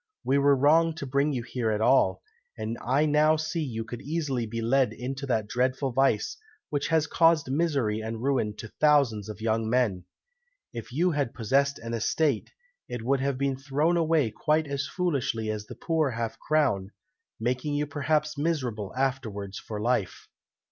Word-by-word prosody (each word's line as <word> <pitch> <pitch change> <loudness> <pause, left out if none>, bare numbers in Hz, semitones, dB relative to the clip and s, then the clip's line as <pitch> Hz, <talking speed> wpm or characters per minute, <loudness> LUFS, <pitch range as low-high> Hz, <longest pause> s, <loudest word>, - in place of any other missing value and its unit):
We 140 +2 +2
were 140 0 +5
wrong 160 +4 +4
to 155 - -5
bring 140 +3 +1
you 125 -4 -2
here 120 -1 -2
at 105 -1 0
all; 130 +5 +3 0.3
and 110 +2 -3
I 135 +5 +2
now 155 +1 +4
see 160 +2 -2
you 115 -7 -3
could 115 +1 -8
easily 140 -6 -2
be 115 +2 -4
led 120 0 +2
into 135 +4 -5
that 110 -4 0
dreadful 130 +3 0
vice, 120 -4 +1 0.3
which 145 -1 -1
has 160 -2 +2
caused 165 -3 +3
misery 135 -9 0
and 110 +1 -5
ruin 130 -6 0
to 110 0 -9
thousands 140 -9 +3
of 110 0 -8
young 110 0 0
men. 110 -8 +1 0.7
If 115 0 -7
you 175 +8 +2
had 145 -6 -1
possessed 140 +4 +1
an 115 0 -6
estate, 125 +3 0 0.4
it 120 -2 -5
would 135 +3 +1
have 135 0 -1
been 140 0 0
thrown 145 +5 +1
away 160 -7 +2
quite 155 +6 +1
as 140 -1 -3
foolishly 135 - -1
as 105 -1 -5
the - - -9
poor 160 -4 0
half 115 -2 -4
crown, 140 -12 +1 0.5
making 130 +5 -1
you 145 +1 0
perhaps 150 +1 -1
miserable 125 - -2
afterwards 110 -7 -2
for 105 -2 -6
life." 110 -4 -1
135 Hz, 175 wpm, -27 LUFS, 115-150 Hz, 0.7 s, were